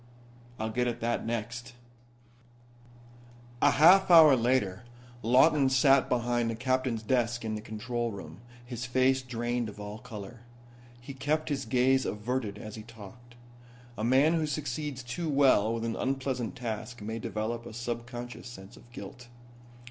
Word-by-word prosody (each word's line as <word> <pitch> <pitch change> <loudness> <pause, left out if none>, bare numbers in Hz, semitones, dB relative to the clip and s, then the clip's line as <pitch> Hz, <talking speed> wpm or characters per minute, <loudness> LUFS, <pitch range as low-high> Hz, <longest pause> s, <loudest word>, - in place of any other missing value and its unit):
"I'll 110 0 -3
get 125 +2 0
at 120 -1 -3
that 115 0 -1
next." 120 +2 -4 1.9
A - - +6
half 180 +6 +6
hour 160 -5 +9
later 115 -6 +1 0.4
Lawton 135 +4 +4
sat 135 +1 +4
beside 120 -1 0
the 115 - -2
captain's 130 -2 -1
desk 120 0 0
in 110 - -2
the 105 - -4
control 120 +2 -3
room, 90 -4 -9 0.3
his 120 0 -5
face 130 +1 +2
drained 120 -2 -3
of 105 - -12
all 105 +1 -7
color. 110 -1 -9 0.6
He 120 +3 -9
kept 150 +4 -1
his 135 -2 -2
gaze 130 +1 +3
averted 105 0 -3
as 105 0 -8
he 110 - -7
talked. 115 +2 -14 0.6
A 110 - -5
man 135 +7 +4
who 160 -2 0
succeeds 145 -2 -4
too 155 +7 -4
well 135 -7 +4
with 115 0 -2
an 115 - -2
unpleasant 130 -2 -2
task 115 -2 -5
may 110 +2 -4
develop 115 +2 -4
a - - -8
subconscious 120 +1 -6
sense 105 -2 -11
of 120 - -18
guilt. 120 0 -10
120 Hz, 150 wpm, -29 LUFS, 115-130 Hz, 1.9 s, hour